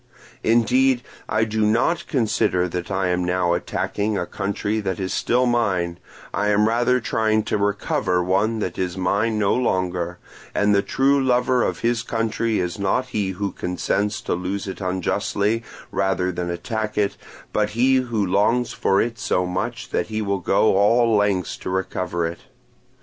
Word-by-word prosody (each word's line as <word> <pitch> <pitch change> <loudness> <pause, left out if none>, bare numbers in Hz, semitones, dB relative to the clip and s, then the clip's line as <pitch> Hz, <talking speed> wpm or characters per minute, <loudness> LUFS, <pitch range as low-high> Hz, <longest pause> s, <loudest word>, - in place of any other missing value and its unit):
Indeed 125 +3 +3 0.3
I 110 +1 +2
do 110 0 -1
not 120 +11 +1
consider 110 - +1
that 90 0 -4
I 95 -1 0
am 90 0 0
now 90 -1 +1
attacking 100 +4 -1
a - - -1
country 100 +2 -2
that 95 -3 -3
is 95 -1 -2
still 125 +1 +2
mine; 95 -8 0 0.3
I 105 - 0
am 105 +1 +3
rather 120 +3 +2
trying 110 -1 +1
to - - -1
recover 100 -3 0
one 100 +5 +1
that 90 -4 -3
is 90 0 -2
mine 105 +4 +1
no 100 -2 +2
longer; 90 -7 -1 0.4
and 105 0 +3
the 100 - +4
true 135 +5 +2
lover 125 0 +2
of - - -1
his 115 -1 +1
country 115 -2 -1
is 90 +1 -2
not 115 +6 0
he 105 -5 -1
who 100 +1 -3
consents 100 +4 -1
to - - -2
lose 95 +3 -3
it 95 - -6
unjustly 100 +4 0 0.3
rather 95 -1 0
than 90 0 -3
attack 105 +5 -3
it, 100 -1 +1 0.4
but 105 0 +1
he 130 +2 +4
who 120 -5 0
longs 110 +6 +1
for 95 - +2
it 115 -1 -3
so 90 -4 0
much 90 +1 -4
that - - 0
he 110 0 -3
will 100 -2 -1
go 95 +2 +3
all 115 +3 +4
lengths 100 -3 +1
to - - -6
recover 90 -2 -2
it. 85 +1 -4
105 Hz, 170 wpm, -22 LUFS, 90-115 Hz, 0.4 s, the